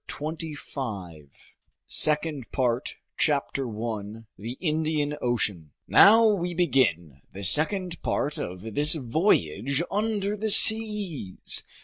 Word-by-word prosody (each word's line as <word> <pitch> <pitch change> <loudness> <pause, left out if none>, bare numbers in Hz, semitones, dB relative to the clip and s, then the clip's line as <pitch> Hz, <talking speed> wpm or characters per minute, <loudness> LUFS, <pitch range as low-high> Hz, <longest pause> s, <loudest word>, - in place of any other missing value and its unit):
END 150 +2 -3
OF - - -13
THE 160 -2 -4
FIRST - - -13
PART 90 - -7 0.6
SECOND 150 -4 0
PART 125 -1 -1 0.2
CHAPTER 140 -3 0
1 110 -1 -6
The 115 +4 -7
Indian 155 -1 -2
Ocean 100 - -2
NOW 225 +3 +7
WE 180 -5 0
BEGIN 115 - 0
the 100 - -8
second 170 - +1
part 145 +1 -2
of 95 +5 -7
this 150 +5 +4
voyage 135 - 0
under 210 -1 -1
the 215 +1 -3
seas. 210 - +3
145 Hz, 120 wpm, -25 LUFS, 110-175 Hz, 0.6 s, NOW